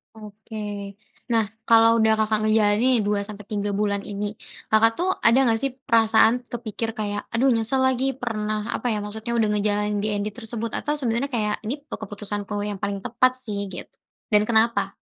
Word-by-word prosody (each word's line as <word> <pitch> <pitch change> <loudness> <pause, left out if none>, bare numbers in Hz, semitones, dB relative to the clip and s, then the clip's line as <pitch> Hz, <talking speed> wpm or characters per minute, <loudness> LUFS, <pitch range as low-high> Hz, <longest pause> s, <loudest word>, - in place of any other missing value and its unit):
Oke. 215 +1 -12 0.7
Nah, 225 -2 +2 0.2
kalau 225 0 +7
udah 220 0 +4
Kakak 215 0 +1
ngejalanin 215 +2 +3
2 205 0 +1
sampai 210 -2 -9
3 205 -1 -1
bulan 200 -1 0
ini. 205 0 -5 0.4
Kakak, 220 +1 +5
tuh, 365 +2 0 0.2
ada 230 +2 +6
gak, 225 0 +2
sih, 275 -1 0 0.2
perasaan 225 0 +5 0.2
kepikir 230 -1 -4
kayak, 205 -1 -2
"Aduh, 260 +4 +3
nyesel 230 +3 0
lagi 260 0 +1 0.2
pernah" 215 -3 -2
apa, - - -6
ya, 210 - -1
maksudnya 220 +2 -5
udah 220 -2 +3
ngejalanin 210 0 0
DND 205 -1 -1
tersebut, 230 0 -5
atau 295 - -1
sebenarnya 245 0 -1
kayak, 210 -2 0
"Ini 235 +6 -1
pe - - -4
keputusanku 205 0 -5 0.2
yang 200 -2 -5
paling 200 -1 -2
tepat, 255 +2 +3
sih." 210 -4 -4
gitu 180 - -8 0.4
dan 210 - +6
kenapa? 220 -3 +2
215 Hz, 170 wpm, -24 LUFS, 210-230 Hz, 0.7 s, kalau